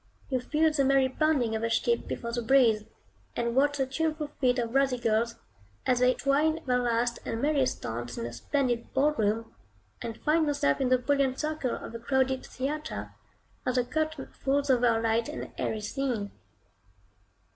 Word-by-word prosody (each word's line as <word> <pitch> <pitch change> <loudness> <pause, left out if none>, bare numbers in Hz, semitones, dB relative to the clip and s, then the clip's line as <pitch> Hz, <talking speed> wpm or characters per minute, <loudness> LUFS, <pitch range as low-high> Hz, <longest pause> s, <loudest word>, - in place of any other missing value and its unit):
You 260 -2 +1
feel 310 +5 +2
the 285 -2 +2
merry 270 -1 +4
bounding 260 -5 +1
of 220 - -2
a 230 - 0
ship 235 +1 +1
before 235 - -4
the 240 +1 -1
breeze; 225 -3 +4 0.5
and 235 0 -1
watch 285 +2 +3
the 270 - +1
tuneful 305 +2 -2
feet 250 -1 +3
of 235 -1 -2
rosy 270 -2 +3
girls, 230 0 +1 0.5
as 250 -1 +2
they 250 0 +4
twine 300 +4 +2
their 250 -1 +2
last 240 0 0
and 225 - -3
merriest 280 -1 +1
dance 120 +1 -4
in 115 - -3
a 120 - -6
splendid 245 - -1
ballroom; 225 -6 +1 0.5
and 230 -1 -5
find 315 +1 +2
yourself 275 - +1
in 260 - +2
the 255 - +5
brilliant 270 0 +1
circle 305 -5 -1
of - - -8
a 230 - -5
crowded 265 +1 +1
theatre, 300 +4 -4 0.5
as 255 - -1
the 250 -1 +2
curtain 310 0 -2
falls 280 +1 +1
over 245 -1 +4
a 225 -1 +3
light 225 0 +1
and - - -6
airy 220 - -1
scene. 230 -2 -2
255 Hz, 180 wpm, -28 LUFS, 230-280 Hz, 0.5 s, the